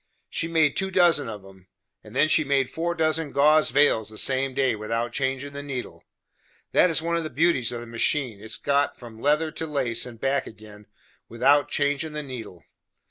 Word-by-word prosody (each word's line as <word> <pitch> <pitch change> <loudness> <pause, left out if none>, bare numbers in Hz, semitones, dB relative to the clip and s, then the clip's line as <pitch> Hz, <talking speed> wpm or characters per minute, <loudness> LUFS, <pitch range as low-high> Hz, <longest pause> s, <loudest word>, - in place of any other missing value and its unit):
She 165 - -2
made 160 -3 +2
two 190 0 -1
dozen 175 -8 +3
of 105 -3 -8
'em, 95 -1 -17 0.4
and - - -13
then 155 - +4
she 155 0 +3
made 135 -3 0
four 170 +1 -2
dozen 160 -2 0
gauze 150 +2 +4
veils 145 -7 +3
the 110 - -8
same 135 +1 0
day, 135 -4 +1
without 115 +3 -3
changin' 135 +1 -2
the 140 - -6
needle. 140 -3 -6 0.7
That 180 - +4
is 160 -1 0
one 170 0 0
of 165 - -2
the 155 - -4
beauties 150 -4 +1
of 120 -1 -5
the - - -8
machine, 120 0 -1
its 110 - -4
goin' 140 0 +1
from 115 -2 -12
leather 150 +2 +1
to 160 - -5
lace, 125 -6 -1
and 115 -2 -11
back 135 +2 0
again, 105 -1 -13 0.4
without 140 +5 +3
changin' 145 +2 -1
the 150 0 -4
needle. 115 - -9
140 Hz, 195 wpm, -25 LUFS, 115-155 Hz, 0.7 s, then